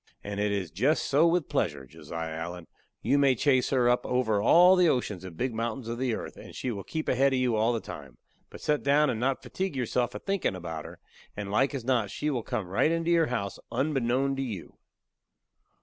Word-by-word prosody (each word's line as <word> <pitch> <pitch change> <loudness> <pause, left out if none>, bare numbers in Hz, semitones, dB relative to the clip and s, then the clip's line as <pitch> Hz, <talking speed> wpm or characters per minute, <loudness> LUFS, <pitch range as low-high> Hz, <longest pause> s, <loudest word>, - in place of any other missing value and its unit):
And 100 0 -5
it 105 0 +1
is 100 -4 -2
jest 130 - +1
so 150 +4 +4
with 170 -2 +1
pleasure, 65 - -1
Josiah 80 +5 -6
Allen; 85 +2 -6 0.4
you 140 - +3
may 135 -2 +4
chase 130 0 +2
her 125 -3 +2
up 125 0 +3
over 110 -5 +1
all 175 - +7
the 180 -2 +4
oceans 105 - -1
and 90 -3 -9
big 125 -1 -1
mountains 115 +2 -3
of 115 +1 -4
the 125 -3 0
earth, - - -7
and - - -11
she 130 - -3
will 100 -3 -5
keep 160 -1 -4
ahead 135 +2 +3
of - - +2
you 125 -3 +1
all 110 +2 +2
the 115 - -1
time; 70 - -10 0.3
but - - -12
set 150 -1 +1
down 145 +1 +3
and 110 - -3
not 130 +2 0
fatigue 190 -5 -3
yourself 125 -1 -1
a - - -4
thinkin' 195 - -1
about 80 -3 -6
her, - - -11 0.4
and 100 -1 -4
like 135 +7 +2
as 125 -4 -5
not 120 -6 +1
she 150 +7 -2
will 125 -4 -1
come 110 -3 -3
right 95 - +1
into 165 +1 0
your 165 -2 +4
house 100 -6 -3
unbeknown 135 0 0
to - - -1
you." 110 -10 -5
125 Hz, 225 wpm, -28 LUFS, 105-140 Hz, 0.4 s, all